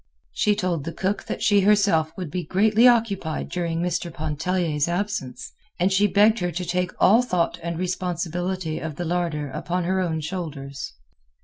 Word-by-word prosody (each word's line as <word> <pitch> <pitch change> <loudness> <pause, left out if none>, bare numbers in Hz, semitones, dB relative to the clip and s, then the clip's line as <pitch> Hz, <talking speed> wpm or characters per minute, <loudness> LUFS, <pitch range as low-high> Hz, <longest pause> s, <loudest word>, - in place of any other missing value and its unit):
She 210 -2 +2
told 175 -6 -1
the 165 +2 -5
cook 195 +2 -2
that - - -4
she 205 -4 +4
herself 195 -6 +3
would 180 -6 -5
be 180 -1 -2
greatly 215 +6 +4
occupied 205 -10 +1
during 170 -2 -2
Mr. 175 -1 -2
Pontellier's 155 0 -1
absence, 175 -7 -3 0.3
and 185 +2 +2
she 200 +2 +4
begged 210 +3 +4
her 180 -1 -1
to 180 +2 -4
take 180 +1 0
all 225 +5 +6
thought 180 -10 -1
and 170 0 -4
responsibility 180 -1 -2
of 155 -2 -5
the 175 - -4
larder 165 -4 -2
upon 175 +6 -2
her 190 +2 0
own 165 -4 -1
shoulders. 150 -5 -5
180 Hz, 170 wpm, -24 LUFS, 160-190 Hz, 0.3 s, all